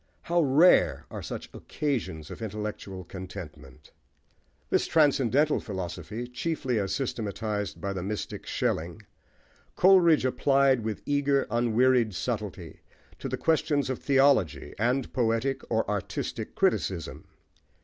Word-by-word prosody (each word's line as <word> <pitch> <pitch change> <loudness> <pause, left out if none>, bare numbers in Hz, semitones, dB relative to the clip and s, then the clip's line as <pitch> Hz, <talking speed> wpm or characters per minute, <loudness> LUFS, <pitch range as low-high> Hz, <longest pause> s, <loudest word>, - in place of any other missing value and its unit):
How 170 0 +2
rare 155 +5 +4
are - - -6
such - - -6
occasions 115 - -3
of - - -9
intellectual 105 -3 -5
contentment! 85 -8 -10 0.8
This - - +2
transcendental 145 -1 +3
philosophy, 95 +3 -5
chiefly 125 -1 -2
as 100 -1 -2
systematised 105 -5 -3
by 100 -1 -3
the 95 - -4
mystic 100 +3 -5
Schelling, 85 +6 -2 0.7
Coleridge 175 -6 +5
applied 135 0 +3
with 110 -2 -2
an - - -27
eager, 140 -1 +1
unwearied 120 -1 +2
subtlety, 100 -7 -4 0.4
to - - -4
the - - -2
questions 145 -4 +1
of 130 - -4
theology, 135 - +2
and 125 +3 0
poetic 125 +2 0
or 110 -1 0
artistic 105 -2 -4
criticism. 85 -5 -1
115 Hz, 120 wpm, -27 LUFS, 100-140 Hz, 0.8 s, Coleridge